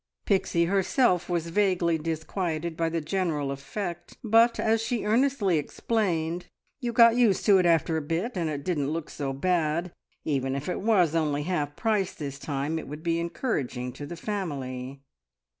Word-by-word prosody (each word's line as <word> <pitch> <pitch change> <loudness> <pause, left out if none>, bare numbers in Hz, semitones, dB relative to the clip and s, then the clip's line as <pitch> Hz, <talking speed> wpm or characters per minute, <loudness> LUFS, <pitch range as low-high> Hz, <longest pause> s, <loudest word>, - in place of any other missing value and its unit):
Pixie 180 -4 +2
herself 190 +1 +2
was 170 -1 -1
vaguely 175 -3 +2
disquieted 165 +1 -3
by 165 0 0
the 165 0 -2
general 155 -4 -1
effect, 170 +6 -6
but, 230 +1 +4
as 225 0 +2
she 230 -1 -2
earnestly 220 - +2
explained, 175 -1 -1 0.3
you 240 -4 -2
"got 230 0 +6
used 225 -6 +3
to 200 -2 +6
it 180 - +3
after 165 -1 +2
a - - -1
bit, 170 +11 -2
and 170 -3 -1
it 145 -2 -4
didn't 145 -6 -1
look 160 0 -4
so 140 -2 -3
bad. 160 +2 +1
And 180 - -12 0.3
even 135 -3 0
if 140 +1 -4
it 180 - -2
was 190 -7 +3
only 150 -3 0
half 150 -4 -2
price 210 -3 0
this 140 -2 -6
time, 145 +3 -2
it - - -8
would 150 +2 -8
be 165 -1 +1
encouraging 135 - -2
to 145 +3 -8
the 170 - -7
family!" 140 -9 -4
170 Hz, 175 wpm, -27 LUFS, 150-195 Hz, 0.3 s, got